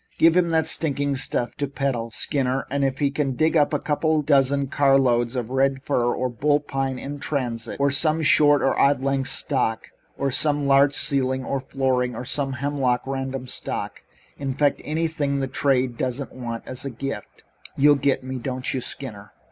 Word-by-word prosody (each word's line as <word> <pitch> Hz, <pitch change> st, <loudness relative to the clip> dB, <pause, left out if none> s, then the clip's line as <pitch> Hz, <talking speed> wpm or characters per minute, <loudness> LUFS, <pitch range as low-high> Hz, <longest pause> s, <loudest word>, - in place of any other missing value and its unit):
"Give 165 Hz, +1 st, +5 dB
him 180 Hz, -2 st, +3 dB
that 160 Hz, -1 st, +2 dB
stinking 145 Hz, -3 st, -1 dB
stuff 120 Hz, -2 st, -2 dB
to 145 Hz, -, -1 dB
peddle, 135 Hz, -4 st, -2 dB
Skinner, 135 Hz, +2 st, 0 dB
and 140 Hz, 0 st, 0 dB
if 135 Hz, -1 st, 0 dB
you 140 Hz, -, +2 dB
can 140 Hz, -2 st, -1 dB
dig 160 Hz, +5 st, +2 dB
up 150 Hz, -2 st, +4 dB
a 150 Hz, -, +1 dB
couple 155 Hz, 0 st, 0 dB
of -, -, -12 dB
dozen 140 Hz, -1 st, +3 dB
carloads 130 Hz, -3 st, +2 dB
of 125 Hz, -1 st, -3 dB
red 135 Hz, 0 st, +1 dB
fir 120 Hz, -4 st, +1 dB
or 130 Hz, -, -1 dB
bull 145 Hz, +5 st, +1 dB
pine 135 Hz, -2 st, -3 dB
in 140 Hz, +2 st, -6 dB
transit, 120 Hz, -6 st, -3 dB
or 140 Hz, 0 st, +3 dB
some 155 Hz, +3 st, +2 dB
short 145 Hz, -1 st, +5 dB
or 135 Hz, -, +2 dB
odd 140 Hz, -1 st, +3 dB
length 135 Hz, -1 st, 0 dB
stock, 125 Hz, -5 st, -1 dB, 0.3 s
or 140 Hz, 0 st, -1 dB
some 145 Hz, +2 st, +1 dB
larch 140 Hz, +1 st, +4 dB
ceiling 130 Hz, -1 st, 0 dB
or 140 Hz, -, -1 dB
flooring, 130 Hz, -2 st, -1 dB
or 125 Hz, -, -6 dB
some 135 Hz, +1 st, -1 dB
hemlock 130 Hz, -2 st, 0 dB
random 135 Hz, -1 st, -4 dB
stock 125 Hz, -, -5 dB, 0.4 s
in 135 Hz, -2 st, -3 dB
fact, 145 Hz, 0 st, +1 dB
anything 155 Hz, -3 st, -1 dB
the 135 Hz, -, 0 dB
trade 130 Hz, -2 st, 0 dB
doesn't 130 Hz, +2 st, -3 dB
want 115 Hz, -2 st, -5 dB
as 130 Hz, -, -7 dB
a 140 Hz, -, -3 dB
gift 135 Hz, +3 st, -7 dB, 0.3 s
you 145 Hz, +1 st, +6 dB
get 140 Hz, -2 st, 0 dB
me, 130 Hz, 0 st, -5 dB
don't 130 Hz, +1 st, -3 dB
you, 130 Hz, -, -2 dB
Skinner?" 105 Hz, -6 st, -6 dB
135 Hz, 190 wpm, -23 LUFS, 130-145 Hz, 0.4 s, you